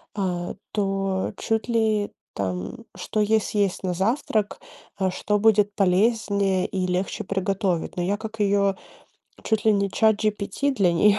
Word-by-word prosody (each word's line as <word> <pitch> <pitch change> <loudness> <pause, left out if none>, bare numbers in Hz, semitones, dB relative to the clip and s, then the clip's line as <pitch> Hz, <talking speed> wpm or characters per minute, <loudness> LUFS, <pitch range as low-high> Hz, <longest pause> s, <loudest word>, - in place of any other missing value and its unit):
а, 180 -3 -2 0.2
то 195 -2 -1
чуть 225 +1 -1
ли 220 -3 +1 0.2
там, 95 - -4
что 215 - -1
ей 220 +1 +3
съесть 200 -3 -1
на 180 -1 0
завтрак, 215 +2 0 0.4
а 190 -1 +1
что 210 +2 0
будет 210 -1 +4
полезнее 200 -1 +2
и 185 -1 -2
легче 180 +2 -2
приготовить. 195 -2 -1
Но 175 - 0
я 200 +3 0
как 220 0 -8
её 200 -1 +2 0.7
чуть 220 -1 0
ли 220 - +5
не 200 -1 +1
Чат-GPT 215 +5 +1
для 190 -8 +2
неё. 205 +4 +4
200 Hz, 145 wpm, -24 LUFS, 190-215 Hz, 0.7 s, ли